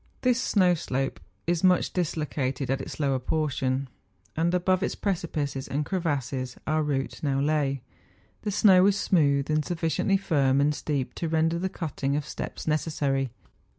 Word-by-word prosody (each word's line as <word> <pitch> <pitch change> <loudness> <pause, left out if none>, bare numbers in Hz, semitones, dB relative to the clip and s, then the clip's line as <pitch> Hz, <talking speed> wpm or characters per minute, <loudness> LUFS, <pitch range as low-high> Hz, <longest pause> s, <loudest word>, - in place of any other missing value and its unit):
This 250 0 +2
snow 185 -7 +3
slope 135 - -2 0.3
is 170 0 0
much 185 -1 +3
dis¬ 175 -3 -1
located 135 -3 -2
at 135 0 0
its - - -7
lower 135 -3 +1
portion, 135 -2 -1 0.5
and 165 +2 +1
above 185 +1 +2
its - - -1
precipices 155 -8 -2
and 145 +2 -1
crevasses 135 -8 -2
our 155 0 +1
route 140 -3 -2
now 140 -2 0
lay. 140 -2 0 0.6
The 210 - -2
snow 195 -2 +6
was 200 +1 +4
smooth, 140 -5 +2
and 155 0 +2
sufficiently 175 +4 0
firm 140 -8 +2
and 145 +1 +3
steep 145 -3 -2
to 170 - -3
render 165 +1 +1
the 190 +2 -1
cutting 140 -5 -2
of 145 -1 -1
steps - - -6
necessary. 145 -4 0
150 Hz, 160 wpm, -27 LUFS, 135-175 Hz, 0.6 s, snow